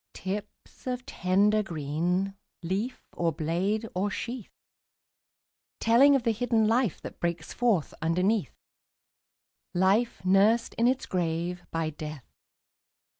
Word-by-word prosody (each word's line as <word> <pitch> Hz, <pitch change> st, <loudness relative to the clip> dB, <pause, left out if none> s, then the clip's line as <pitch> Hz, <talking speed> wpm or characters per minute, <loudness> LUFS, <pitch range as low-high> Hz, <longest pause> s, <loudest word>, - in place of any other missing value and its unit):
Tips 195 Hz, +6 st, -7 dB
of 250 Hz, 0 st, -3 dB
tender 200 Hz, +4 st, +2 dB
green, 175 Hz, +3 st, -1 dB, 0.3 s
Leaf, 200 Hz, +9 st, -2 dB
or 170 Hz, -1 st, 0 dB
blade, 180 Hz, +8 st, -1 dB
or 190 Hz, +3 st, 0 dB
sheath; 235 Hz, +2 st, -5 dB, 1.3 s
Telling 265 Hz, +5 st, +6 dB
of 265 Hz, -, +1 dB
the 230 Hz, -, +2 dB
hidden 225 Hz, -1 st, +2 dB
life 230 Hz, -3 st, +2 dB
That -, -, -9 dB
breaks 170 Hz, -2 st, -2 dB
forth 225 Hz, -10 st, +1 dB
underneath, 180 Hz, -, +1 dB, 1.2 s
Life 195 Hz, +4 st, +2 dB
nursed 205 Hz, +5 st, +4 dB
in 235 Hz, -, +2 dB
its 255 Hz, +1 st, +1 dB
grave 175 Hz, 0 st, -2 dB
by 165 Hz, -1 st, -2 dB
Death. 150 Hz, -3 st, -7 dB
195 Hz, 115 wpm, -28 LUFS, 170-230 Hz, 1.3 s, Telling